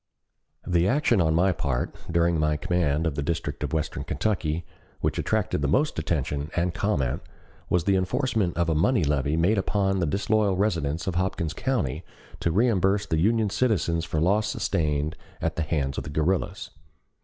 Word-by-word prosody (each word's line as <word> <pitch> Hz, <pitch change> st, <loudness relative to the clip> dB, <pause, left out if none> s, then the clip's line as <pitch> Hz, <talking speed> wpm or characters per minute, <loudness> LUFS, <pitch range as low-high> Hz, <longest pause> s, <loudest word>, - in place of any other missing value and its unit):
The 85 Hz, 0 st, +2 dB
action 125 Hz, -4 st, +3 dB
on 80 Hz, -1 st, +2 dB
my 95 Hz, +3 st, +4 dB
part, 70 Hz, -6 st, -2 dB, 0.2 s
during 85 Hz, -1 st, +2 dB
my 75 Hz, 0 st, +1 dB
command 80 Hz, -1 st, 0 dB
of 80 Hz, -, 0 dB
the 70 Hz, -, -3 dB
district 80 Hz, +3 st, -3 dB
of -, -, -2 dB
western 80 Hz, -3 st, -2 dB
Kentucky, 80 Hz, +1 st, -1 dB, 0.3 s
which -, -, -1 dB
attracted -, -, 0 dB
the 70 Hz, -, +1 dB
most 145 Hz, -, +1 dB
attention 75 Hz, -2 st, -2 dB
and 85 Hz, 0 st, 0 dB
comment, 85 Hz, -10 st, 0 dB, 0.5 s
was 90 Hz, -2 st, +2 dB
the 100 Hz, +2 st, +2 dB
enforcement 105 Hz, -1 st, 0 dB
of 85 Hz, -1 st, +1 dB
a 80 Hz, -, +2 dB
money 90 Hz, +7 st, +2 dB
levy 75 Hz, +1 st, +1 dB
made 95 Hz, +6 st, +3 dB
upon 95 Hz, -1 st, 0 dB
the 85 Hz, -, +1 dB
disloyal 100 Hz, +2 st, +1 dB
residents 85 Hz, -6 st, 0 dB
of 95 Hz, -, -1 dB
Hopkins 85 Hz, -3 st, -1 dB
County 80 Hz, -, -1 dB, 0.4 s
to -, -, 0 dB
reimburse 100 Hz, 0 st, +2 dB
the 80 Hz, -, 0 dB
Union 110 Hz, +3 st, +2 dB
citizens 100 Hz, -8 st, +1 dB
for 80 Hz, -2 st, -2 dB
losses 105 Hz, +6 st, +2 dB
sustained 75 Hz, -1 st, -1 dB, 0.2 s
at 80 Hz, -1 st, -1 dB
the -, -, -1 dB
hands 75 Hz, -3 st, -1 dB
of -, -, -6 dB
the -, -, -7 dB
guerrillas. 80 Hz, +5 st, -1 dB
85 Hz, 175 wpm, -26 LUFS, 75-100 Hz, 0.5 s, my